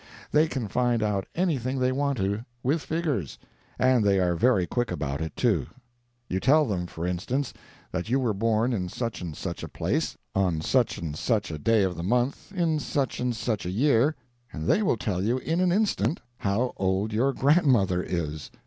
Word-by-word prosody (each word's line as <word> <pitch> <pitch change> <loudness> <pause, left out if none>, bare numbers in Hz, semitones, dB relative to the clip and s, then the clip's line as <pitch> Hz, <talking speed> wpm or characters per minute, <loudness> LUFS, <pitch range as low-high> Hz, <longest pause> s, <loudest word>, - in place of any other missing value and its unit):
They 155 +2 +4
can 130 -7 -3
find 120 0 +1
out 100 -2 -1
anything 135 -8 0
they 130 0 +2
want 140 0 0
to 100 +2 -1 0.2
with 145 +5 +1
figures, 150 - -2 0.4
and 130 -3 +4
they 100 -1 +3
are 90 -1 +2
very 105 -1 +3
quick 120 +6 -1
about 70 -4 -3
it, 80 - -4
too. 100 - +1 0.6
You 95 - -1
tell 150 +8 +4
them, 90 -7 -2
for 85 0 -5
instance, 110 +8 -2 0.4
that 90 - -3
you 130 +3 +2
were 120 -5 +1
born 115 +4 +1
in 90 -5 -2
such 115 +1 -4
and 80 -4 -6
such - - -5
a - - -5
place, - - -1 0.2
on 90 -5 +1
such 125 +8 +1
and 80 -3 -4
such 105 +2 0
a 80 - -5
day 110 +5 +3
of 95 -2 0
the - - -5
month, 125 - 0
in 170 -5 +1
such 140 -2 -1
and 125 -1 0
such 110 -2 -2
a 90 - -3
year, 135 - +3 0.4
and 75 - -5
they 210 - +3
will 185 - +2
tell 95 -5 -2
you 115 +6 +1
in 165 +6 -1
an 180 -1 +3
instant 200 -3 +1 0.2
how 105 +6 0
old 95 +3 0
your 125 +6 +2
grandmother 130 - +3
is. 80 -5 -3
115 Hz, 195 wpm, -26 LUFS, 95-135 Hz, 0.6 s, They